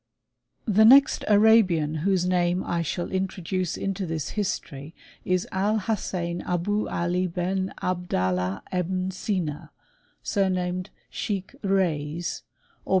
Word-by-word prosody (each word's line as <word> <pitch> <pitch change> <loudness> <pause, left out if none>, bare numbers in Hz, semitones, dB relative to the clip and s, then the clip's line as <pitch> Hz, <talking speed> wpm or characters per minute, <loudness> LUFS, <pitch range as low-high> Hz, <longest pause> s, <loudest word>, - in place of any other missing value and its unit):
* - - -57 0.2
The 215 -1 +4
next 270 +5 +6
Arabian 205 -8 +4
whose 180 +2 +1
name 180 0 +1
I 170 -1 -1
shall 175 +2 -3
introduce 185 -1 -2
into 195 -1 -3
this 160 -3 -3
history, 160 -7 -4 0.3
is 185 -1 0
Al 205 +3 +1
Hassain 180 -5 -2
Abou 200 +4 -1
Ali 180 +2 0
Ben 185 +2 -2
Abdal 175 - 0
lah 90 +1 -2
Ebn 185 +1 -1
Sina, 180 -6 -3 0.5
sumamed 185 -2 0 0.2
Scheik 195 0 -3
Reyes, 170 -5 -1 0.4
or. - - -15
185 Hz, 120 wpm, -25 LUFS, 170-195 Hz, 0.5 s, next